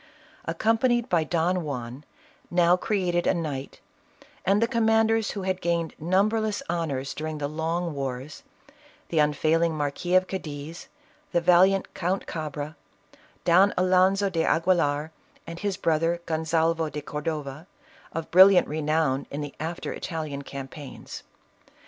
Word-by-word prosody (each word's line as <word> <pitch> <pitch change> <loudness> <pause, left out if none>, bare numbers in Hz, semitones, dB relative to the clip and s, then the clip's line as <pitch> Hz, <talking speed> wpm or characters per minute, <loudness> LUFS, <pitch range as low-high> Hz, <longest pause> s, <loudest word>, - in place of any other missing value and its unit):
Accompanied 225 +7 +1
by 170 -3 +3
Don 175 +2 0
Juan, 130 -2 -5 0.5
now 175 0 +4
created 180 -3 0
a - - +3
knight, 145 -5 -5 0.6
and 195 +2 +3
the 230 - +2
command 225 -2 +3
ers 225 -1 +1
who 200 - -5
had 185 0 -2
gained 170 -2 -1
numberless 210 - +1
honors 145 -6 -2
during 155 0 -4
the 145 -1 -2
long 165 +2 -2
wars, 135 +1 -5 0.7
the 165 - +1
unfailing 155 +2 +2
Marquis 150 +5 -1
of 185 0 +5
Cadiz, 160 -3 -6 0.5
the 175 - +4
valiant 180 +3 +4
Count 185 +1 -1
Cabra, 155 -1 -5 0.7
Don 185 +3 +5
Alonzo 185 +2 +3
de 165 -2 0
Aguilar, 160 -4 +1 0.3
and 170 0 -8
his 200 -1 -2
brother 165 +1 +1
Gon 160 -1 -2
salvo 165 0 +1
de 150 0 -5
Cordova, 150 +1 -5 0.4
of 165 0 -5
brilliant 190 +1 +7
renown 155 -2 0
in 145 - -5
the 145 -1 -6
after 165 +3 -4
Ital 160 -3 -4
ian 140 -2 -5
campaigns. 140 0 -8
165 Hz, 135 wpm, -26 LUFS, 150-185 Hz, 0.7 s, brilliant